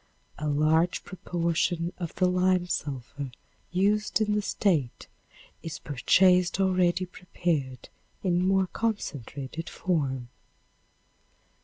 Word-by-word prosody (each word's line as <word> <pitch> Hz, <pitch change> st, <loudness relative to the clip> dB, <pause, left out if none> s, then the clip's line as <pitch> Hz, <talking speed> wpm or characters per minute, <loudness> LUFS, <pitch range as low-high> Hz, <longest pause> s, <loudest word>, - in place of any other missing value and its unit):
A 150 Hz, -, -2 dB
large 155 Hz, +4 st, +2 dB
proportion 170 Hz, -1 st, -1 dB
of 170 Hz, -3 st, -5 dB
the 185 Hz, -, +2 dB
lime 185 Hz, 0 st, +2 dB
sulphur 140 Hz, -4 st, -4 dB, 0.4 s
used 205 Hz, +5 st, +2 dB
in 210 Hz, -1 st, +1 dB
the 210 Hz, -, +1 dB
State 165 Hz, -, 0 dB, 0.6 s
is 165 Hz, -, -5 dB
purchased 180 Hz, +8 st, +3 dB
already 185 Hz, -1 st, +2 dB
prepared 160 Hz, -8 st, -3 dB, 0.4 s
in 180 Hz, -2 st, +2 dB
more 190 Hz, 0 st, +3 dB
concentrated 160 Hz, -, -4 dB
form. 135 Hz, -9 st, -1 dB
175 Hz, 100 wpm, -28 LUFS, 150-185 Hz, 0.6 s, purchased